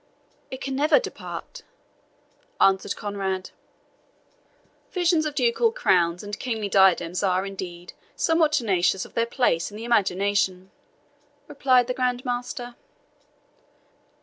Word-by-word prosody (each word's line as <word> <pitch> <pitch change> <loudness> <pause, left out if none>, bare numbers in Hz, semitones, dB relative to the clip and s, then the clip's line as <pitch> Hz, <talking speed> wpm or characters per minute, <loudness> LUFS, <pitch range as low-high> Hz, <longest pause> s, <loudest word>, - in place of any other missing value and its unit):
"It 260 +1 -6
never 280 +4 +2
can - - +4
depart," - - -8 1.0
answered 195 0 +3
Conrade. 195 -2 -4 1.4
"Visions 340 -4 +2
of 295 - -6
ducal 260 - +2
crowns 180 - +1
and 205 0 -6
kingly 220 -5 -3
diadems 185 -3 +3
are, 190 -1 +1
indeed, 180 -3 -7 0.2
somewhat 325 -2 +2
tenacious 190 - +1
of - - -16
their 230 0 0
place 235 -9 +1
in 205 - -10
the 225 - -7
imagination," 195 -3 0 0.8
replied 255 -2 +3
the 250 - -2
Grand 250 0 -1
Master. 245 0 -4
215 Hz, 115 wpm, -24 LUFS, 190-255 Hz, 1.4 s, can